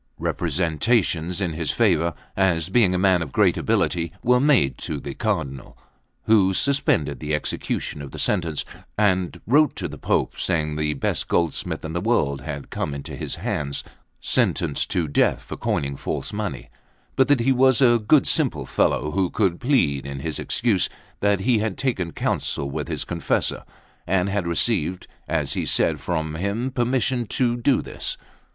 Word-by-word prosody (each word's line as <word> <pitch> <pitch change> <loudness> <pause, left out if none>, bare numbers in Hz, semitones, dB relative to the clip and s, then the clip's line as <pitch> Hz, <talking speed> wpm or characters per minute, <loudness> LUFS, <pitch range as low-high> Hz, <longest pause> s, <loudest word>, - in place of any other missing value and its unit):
Representations 85 - 0
in 90 -5 -1
his 80 -2 -3
favour, 85 +2 +2 0.2
as 90 -3 +2
being 95 -3 +4
a - - +2
man 95 -1 +3
of 75 -5 -4
great - - +3
ability, 85 -1 0
were 125 +1 +4
made 125 - +3
to 75 - -4
the 70 0 -6
Cardinal, 80 - -3 0.5
who 95 -4 +4
suspended 135 - +1
the 75 0 -1
execution 75 0 -3
of 70 - -7
the - - -10
sentence, 85 -7 -1 0.3
and 95 -4 +1
wrote 145 +4 +4
to - - -3
the - - -9
Pope, - - 0
saying 75 -2 0
the 75 -1 -1
best - - -1
goldsmith 85 -2 -1
in 80 - -5
the 85 - -1
world 75 - +1
had 70 +3 -6
come 70 - -3
into 70 - -7
his - - -4
hands, 70 -2 -3 0.4
sentenced 70 - 0
to 85 -3 0
death 70 - +2
for - - -7
coining 70 0 -1
false 100 - -4
money, 105 -1 -4 0.4
but 130 - +4
that 145 -3 +3
he 130 +3 +3
was 130 -1 +4
a 120 -3 +5
good 130 +6 +4
simple - - +1
fellow, 75 +5 +1
who 95 +1 +1
could 95 -5 0
plead 70 - +1
in 70 -1 -5
his 80 +1 -3
excuse 110 -6 +1 0.3
that 100 -1 +2
he 120 +1 +3
had 105 -3 -2
taken 95 -11 -1
counsel 70 - -1
with - - -4
his - - -3
confessor, - - -1 0.4
and 95 +1 +1
had 100 -3 -1
received, 90 0 0 0.2
as - - -1
he - - -1
said, - - +1
from 80 -3 -2
him 100 +10 -2
permission 125 -1 0
to 120 +2 +1
do 125 +3 +2
this. - - -3
90 Hz, 170 wpm, -23 LUFS, 75-115 Hz, 0.5 s, a